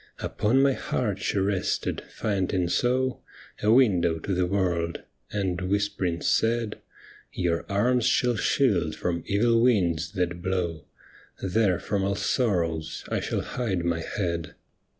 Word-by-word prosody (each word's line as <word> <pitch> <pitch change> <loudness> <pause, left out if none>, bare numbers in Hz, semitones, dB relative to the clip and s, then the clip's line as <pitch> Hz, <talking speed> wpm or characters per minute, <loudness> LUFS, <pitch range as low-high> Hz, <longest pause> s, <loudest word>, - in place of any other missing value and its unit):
Upon 125 +6 +1
my 140 -1 +4
heart 105 -6 -2
she 100 - -1
rested, 95 -1 0
finding 95 -4 -1
so 130 +5 +1 0.4
A 105 - +3
window 95 -10 +4
to 95 +5 -3
the 90 0 +1
world, 90 -3 -1 0.3
and 95 -4 -1
whisp'ring 95 -2 -1
said, 115 -1 +1 0.2
* - - -23
Your 85 -2 -1
arms 120 +4 +2
shall 125 -1 +2
shield 100 - +1
from 85 -1 -2
evil 115 +3 +3
winds 90 -8 +2
that 90 -3 -2
blow, 85 -3 -2 0.6
There 95 -1 +2
from 100 -1 -1
all 100 0 0
sorrows 85 -7 -1
I - - 0
shall - - -2
hide 95 -9 -2
my 85 -1 0
head. 85 -3 -3
95 Hz, 135 wpm, -26 LUFS, 85-110 Hz, 0.6 s, my